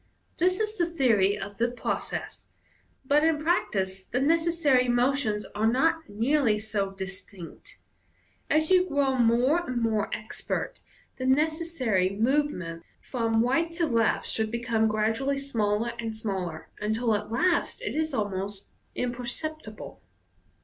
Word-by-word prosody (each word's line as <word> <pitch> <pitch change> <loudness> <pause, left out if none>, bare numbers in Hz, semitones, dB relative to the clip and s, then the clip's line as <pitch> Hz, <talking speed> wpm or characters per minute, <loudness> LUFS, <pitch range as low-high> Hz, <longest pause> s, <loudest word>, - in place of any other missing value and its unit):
This 365 +3 +2
is 430 -1 -2
the 345 - +3
theory 225 - +2
of 200 +1 -7
the 235 +1 +2
process, 245 - -4 0.6
but 290 +3 +3
in 320 -1 +3
practice 195 - 0
tie 245 - -4
necessary 310 -3 +3
motions 240 -3 +1
are 215 +2 +1
not 320 +5 +2
nearly 230 +2 +2
so 210 -2 -2
distinct. 190 -2 -9 0.7
As 310 +2 +2
you 370 0 +5
grow 280 -2 +2
more 245 +6 +4
and 255 -8 -3
more 220 -2 0
expert, 220 - -4 0.4
the 255 - -2
necessary 280 - +1
movement 210 - 0 0.2
from 230 -3 0
right 330 +7 +1
to 335 0 +1
left 230 -6 +1
should 220 -1 0
become 235 -1 +1
gradually 225 +6 0
smaller 230 -4 0
and 225 -2 -4
smaller, 185 -7 -4
until 220 +2 0
at 210 +1 -2
last 355 - +1
it - - -2
is 315 0 0
almost 200 -4 -3 0.3
im? 250 -1 -1
perceptible. 245 0 -6
240 Hz, 135 wpm, -27 LUFS, 210-300 Hz, 0.7 s, you